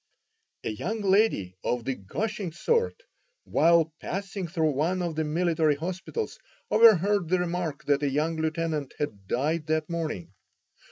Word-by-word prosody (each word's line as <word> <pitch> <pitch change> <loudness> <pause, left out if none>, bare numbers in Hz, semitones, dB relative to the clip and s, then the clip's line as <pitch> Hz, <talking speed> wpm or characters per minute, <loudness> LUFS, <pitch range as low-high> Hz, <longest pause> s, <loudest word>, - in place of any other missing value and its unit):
A - - -2
young 220 - -3
lady 195 - +2
of 120 -2 -1
the 135 - 0
gushing 200 - -4
sort, 470 - 0 0.4
while 165 -1 +3
passing 195 -1 -4
through 160 -3 +1
one 170 +6 0
of 170 -2 -2
the 160 +1 -1
military 160 -1 +2
hospitals, 185 - -4 0.3
overheard 205 -5 +5
the 185 - +3
remark 175 -4 -2
that 145 -1 +2
a 145 - +1
young 155 +4 0
lieutenant 160 -2 -2
had 105 -9 -4
died 155 - 0
that 155 0 0
morning. 155 - -3
165 Hz, 145 wpm, -27 LUFS, 150-185 Hz, 0.4 s, overheard